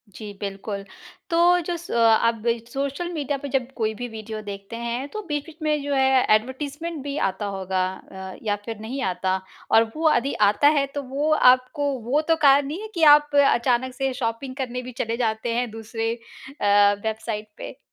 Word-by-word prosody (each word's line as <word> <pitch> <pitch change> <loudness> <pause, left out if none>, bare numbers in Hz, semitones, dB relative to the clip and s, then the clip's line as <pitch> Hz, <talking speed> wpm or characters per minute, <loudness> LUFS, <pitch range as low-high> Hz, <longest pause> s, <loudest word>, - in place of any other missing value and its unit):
जी, 210 +1 -7
बिल्कुल 200 0 -5 0.5
तो 335 - +1 0.3
जो 350 - -1
स 345 - -10
अ, - - 0 0.3
आप 230 -1 -1 0.3
सोशल 280 +5 -2
मीडिया 285 -2 -2
पे 285 - -7
जब 260 0 -1
कोई 220 -2 -1
भी 245 +3 -5
वीडियो 220 -1 -7
देखते 200 +2 -8
हैं, 235 +3 -3
तो 430 - -5
बीच-बीच 300 +2 -4
में 300 -1 +1
जो 285 0 -2
है 265 -1 +4
एडवर्टाइज़मेंट 285 +7 -4
भी 285 +1 -4
आता 190 +2 -5
होगा 190 -1 -1 0.3
अ, 190 0 -8
या 205 -2 +1
फिर 225 -2 -6
नहीं 250 +5 -5
आता 185 +1 -1 0.3
और 225 - +7
वो 320 - -4
यदि 280 -2 +1 0.2
आता 285 +8 +3
है 275 - +3
तो 285 - -2
वो 280 +4 -1 0.2
आपको 280 +3 0 0.2
वो 290 +4 +2
तो - - +6
कारण 275 0 +6
नहीं 330 +8 -5
है 435 - -6
कि 335 - -1
आप 295 -1 -1
अचानक 255 -2 +3
से 270 -1 -1
शॉपिंग 250 +2 -3
करने 250 -2 -3
भी 255 - -8
चले 230 +1 -2
जाते 230 0 -1
हैं 245 0 -1
दूसरे 225 +1 -3
अ, 205 -4 +1
वेबसाइट 220 -1 -3
पे? 260 - -8
250 Hz, 190 wpm, -24 LUFS, 220-285 Hz, 0.5 s, और